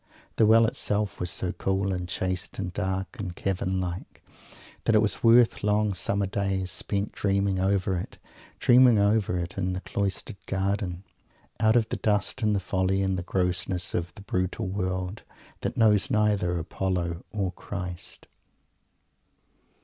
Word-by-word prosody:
The 110 - +5
Well 115 +1 +7
itself 105 -2 -1
was 90 - -2
so 85 +1 -2
cool 95 +1 -1
and 90 -1 -4
chaste 95 0 -3
and 90 -2 -4
dark 95 +5 -3
and 90 -4 -4
cavern 95 0 -1
like, 90 -1 -5 0.6
that 115 - +3
it - - +7
was 105 -2 +1
worth 115 0 +5
long 105 0 +2
summer 100 +3 0
days 95 -1 -1
spent 100 0 -2
dreaming 100 -1 0
over 95 0 +1
it 85 - -6 0.4
dreaming 125 -2 +6
over 100 -2 +2
it 85 +2 -4
in 95 -1 0
the 95 - -4
cloistered 100 +2 -3
garden, 95 -1 -1 0.6
out 110 +1 +4
of 115 -2 +3
the - - -2
dust 105 +4 0
and 105 -1 +2
the - - +1
folly 95 +1 0
and 95 -1 0
the 90 - -2
grossness 90 0 -1
of 85 0 -2
the 100 - -11
brutal 95 +2 -2
World, 95 +1 -3 0.4
that - - -3
knows 105 -3 +4
neither 105 -5 +2
Apollo 85 0 -2
or 100 -4 -1
Christ! 90 -2 -7
95 Hz, 155 wpm, -27 LUFS, 90-105 Hz, 0.6 s, Well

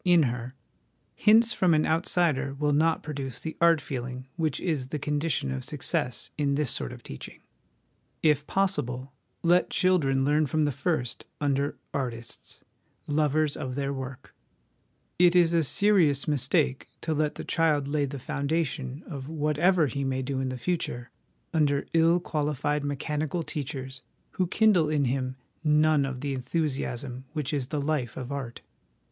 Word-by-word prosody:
in 175 -3 +5
her, 125 0 -3 0.6
hints 225 +2 +5
from 180 -5 +3
an 155 - +3
outsider 160 -4 +1
will 145 +1 +1
not 160 +3 +2
produce 135 -4 -5
the 160 - -5
art 170 -1 +6
feeling 130 -1 -5
which 160 -5 -1
is 150 -8 -1
the 150 - -3
condition 145 - -1
of 65 0 -3
success 125 - -2
in 140 -1 +2
this 145 -3 0
sort - - -3
of 125 -2 -11
teaching. 65 - -9 0.8
If 150 -1 +3
possible, 140 -9 -1 0.3
let 175 +1 +4
the - - -9
children 140 -8 +3
learn 150 +1 +3
from 155 +3 +1
the 145 - +1
first 140 -3 -2
under 140 0 0 0.2
artists, 120 -4 -5 0.4
lovers 150 0 +1
of 130 -1 -4
their 140 0 -1
work: 130 0 -7 0.9
it 175 0 +6
is 170 -2 +5
a 165 - +4
serious 160 -3 +3
mistake 140 -1 +1
to 160 - -1
let 150 0 0
the - - -6
child 150 -4 +2
lay 145 0 +1
the 140 +1 -5
foundation 140 0 -2
of 140 -4 -7
whatever 160 +3 +2
he 140 +1 -2
may 130 -1 -1
do 135 0 -2
in 130 -1 -1
the 130 - -4
future 125 -6 -3 0.4
under 145 -3 +2
ill 165 +1 +4
qualified 150 -3 -1
mechanical 150 +3 -2
teachers, 135 -4 -5 0.3
who 185 - 0
kindle 185 -6 +4
in 150 -2 +2
him 130 0 -1 0.3
none 150 -1 +4
of 130 -2 -5
the 140 -1 -2
enthusiasm 130 -2 -3
which 150 -2 -2
is 135 -4 -1
the 150 +1 -2
life 140 -5 -1
of 130 0 -5
art. 135 -4 -5
145 Hz, 160 wpm, -27 LUFS, 130-160 Hz, 0.9 s, art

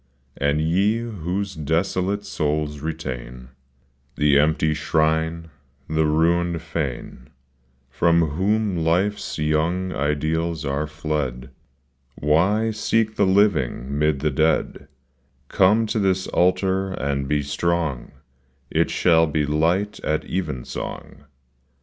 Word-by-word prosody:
And 70 +1 0
ye 95 +8 +2
whose 100 -3 -4
desolate 90 +6 -1
souls 75 -4 -2
retain 65 -5 -6 0.7
The 75 -1 +4
empty 80 +1 +2
shrine, 80 +1 0 0.4
the 80 0 +1
ruined 85 +2 +1
fane, 70 -5 -5 0.6
From 85 +2 +2
whom 100 +4 0
life's 90 +6 0
young 80 +5 0
ideals 80 +3 -1
are 70 +2 -1
fled, 75 -4 -3 0.6
Why 100 +10 +2
seek 110 0 0
the 100 - +2
living 75 - +1
'mid 75 -2 +1
the 75 0 +1
dead; 80 +1 0 0.6
Come 105 +4 +4
to 110 0 -1
this 95 -2 +1
altar 95 +1 +1
and 70 -3 -2
be 75 0 0
strong, 75 -3 -1 0.6
It - - +2
shall 80 -2 +3
be 75 0 0
light 85 +8 0
at 75 0 -2
even 75 -10 -3
song. - - -7
80 Hz, 110 wpm, -22 LUFS, 75-95 Hz, 0.7 s, The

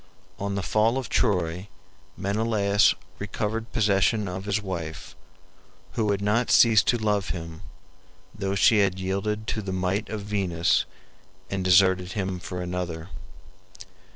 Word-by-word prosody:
On 100 0 -2
the 100 - -2
fall 110 +6 +2
of 130 -4 -4
Troy 90 -4 0 0.5
Menelaus 100 +1 +2 0.2
recovered 110 +3 -3
possession 105 -1 +2
of 95 +2 -5
his 105 +1 0
wife, 85 -6 -6 0.8
who 110 -2 -1
had 100 0 0
not 115 +4 +1
ceased 110 -3 +5
to 120 - +3
love 105 -3 0
him, 85 -1 -6 0.7
though 100 -1 -2
she 105 +2 +5
had 95 -2 +1
yielded 100 +3 -2
to 110 - -2
the 95 -2 -5
might 95 +3 -1
of 110 -1 -4
Venus 95 -5 +1 0.7
and 95 -1 -2
deserted 95 0 +4
him 95 -3 -3
for 90 -1 -5
another. 90 -2 -4
100 Hz, 135 wpm, -25 LUFS, 90-105 Hz, 0.8 s, ceased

